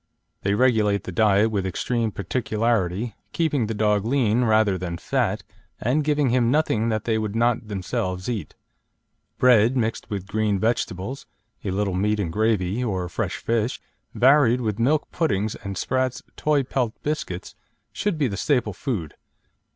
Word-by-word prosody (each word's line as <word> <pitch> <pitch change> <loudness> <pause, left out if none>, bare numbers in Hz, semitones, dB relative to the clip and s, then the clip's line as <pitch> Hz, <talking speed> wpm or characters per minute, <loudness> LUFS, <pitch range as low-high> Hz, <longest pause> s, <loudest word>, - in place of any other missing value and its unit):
They 100 +1 +1
regulate 105 -5 +2
the - - -6
diet 105 +2 +3
with 100 -3 0
extreme 115 +5 -1
particularity, 110 -1 -1 0.2
keeping 145 -8 +1
the 110 - -3
dog 105 -1 +2
lean 120 -1 +2
rather 110 -3 +3
than 90 -2 -4
fat, - - -1 0.4
and 135 +7 +1
giving 145 -2 +2
him 120 -2 +3
nothing 120 -6 +2
that 110 -1 -1
they 110 -2 0
would 110 -1 -3
not 120 -1 +1
themselves 95 -2 -3
eat. 110 -10 -4 0.8
Bread, 125 0 +5
mixed 115 -1 -2
with 100 -3 -4
green 105 0 0
vegetables, 110 +2 -2 0.4
a - - -2
little 100 0 -1
meat 105 +3 +1
and 85 -5 -2
gravy, 110 +1 +1
or 95 -6 -2
fresh - - -3
fish, 115 +1 -1 0.4
varied 130 -2 +5
with 110 -2 -2
milk 145 +6 +1
puddings 110 - 0
and 100 -1 -7
Spratt's 130 0 -1
"Toy 150 -2 +1
Pet" 125 -3 -1
biscuits, 145 -12 -3 0.4
should 205 -5 -1
be 145 -3 +2
the 100 -4 -4
staple 120 -8 +1
food. 95 - -4
110 Hz, 155 wpm, -24 LUFS, 100-125 Hz, 0.8 s, Bread